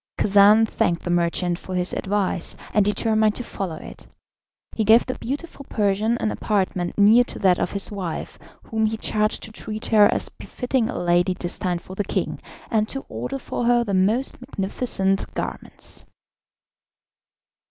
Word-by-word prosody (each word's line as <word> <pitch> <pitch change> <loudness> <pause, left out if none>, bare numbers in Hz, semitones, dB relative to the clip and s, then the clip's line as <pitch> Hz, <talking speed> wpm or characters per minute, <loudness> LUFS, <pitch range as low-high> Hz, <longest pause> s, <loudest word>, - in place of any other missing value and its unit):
Khacan 205 +2 +6
thanked 170 -4 0
the 175 - -2
merchant 175 0 0
for 185 - -6
his 180 0 -1
advice, 195 -3 -1 0.2
and 210 - +4
determined 215 +1 +2
to 245 - -3
follow 190 -7 -5
it. - - -11 0.7
He 220 - 0
gave 220 +3 +6
the 255 - -3
beautiful 280 +4 -6
Persian 210 +2 +1
an 215 - -1
apartment 185 -4 -1
near 215 +4 +6
to - - -6
that 185 -3 +3
of - - -1
his 200 +1 -3
wife, 185 -5 -5 0.2
whom 220 -1 0
he 220 +1 -2
charged 215 -1 0
to 220 - -7
treat 215 0 -6
her 210 -2 +5
as - - +1
befitting 250 -2 -2
a - - -4
lady 175 +1 +2
destined 175 0 -2
for 185 - -10
the 205 - -1
king, - - -2 0.3
and 215 -2 +1
to 270 - -5
order 275 +2 -4
for 245 -2 -4
her 240 0 +4
the 205 -4 -3
most 215 +9 +1
magnificent 195 -4 -1
garments. - - -6
210 Hz, 165 wpm, -23 LUFS, 185-225 Hz, 0.7 s, Khacan